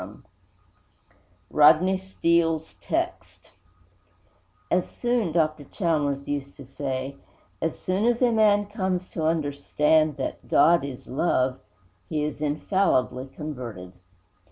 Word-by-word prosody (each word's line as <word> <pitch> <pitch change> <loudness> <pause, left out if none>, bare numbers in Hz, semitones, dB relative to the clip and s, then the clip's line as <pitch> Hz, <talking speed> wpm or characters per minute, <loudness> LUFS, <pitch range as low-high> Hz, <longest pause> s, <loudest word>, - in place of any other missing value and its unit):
X - - -8 1.4
RODNEY 160 +6 +5
STEELE'S 170 -4 0
TEXT 345 +1 -4
I - - -16
'As - - -2
soon,' 240 -7 -1
Dr. 155 -2 0
Chalmers 145 -6 -1
used 140 -1 -4
to 140 - -11
say, 135 0 -4 0.4
'as 165 - -1
soon 190 +4 -1
as 240 0 +2
a 245 - +4
man 210 -2 +4
comes 190 -3 -2
to 165 - -4
understand 150 0 +1
that - - -5
GOD 170 -4 +4
IS 135 -3 -8
LOVE, 130 -2 0 0.5
he 150 -1 -1
is 150 -1 -4
infallibly 145 -4 0
converted.' 125 - -7
155 Hz, 115 wpm, -25 LUFS, 140-185 Hz, 1.4 s, RODNEY